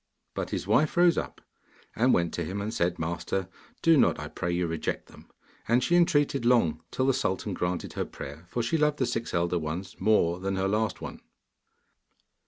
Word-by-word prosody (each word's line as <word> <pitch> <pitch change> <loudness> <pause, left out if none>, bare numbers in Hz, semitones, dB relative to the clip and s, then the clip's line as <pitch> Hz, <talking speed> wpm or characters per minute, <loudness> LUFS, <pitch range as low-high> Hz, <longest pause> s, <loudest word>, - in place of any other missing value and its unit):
But - - -3
his - - -3
wife 130 - +2
rose 175 -1 +6
up - - -4 0.5
and 125 +4 +3
went 85 -2 +2
to 85 - -2
him, 95 +5 -4
and 105 +2 -3
said, 85 -2 0
'Master, 85 +3 -2 0.4
do 165 -1 +6
not, - - +3
I - - -6
pray 85 - -3
you, 90 0 0
reject 80 -1 -3
them,' - - -16 0.4
and 120 +2 +3
she 170 +7 +2
entreated 145 -6 +3
long, 100 -11 +3
till 130 - -1
the 135 - +3
sultan 95 -2 -1
granted 90 0 -2
her - - -2
prayer, 75 +5 -9
for 120 - -1
she 160 +8 0
loved 150 -1 +2
the 130 - +1
six 115 -1 -3
elder 85 0 +1
ones 85 +4 -5
more 95 -4 +3
than 95 +1 -2
her 95 0 0
last 110 +2 0
one. - - -7
95 Hz, 195 wpm, -28 LUFS, 85-125 Hz, 0.5 s, rose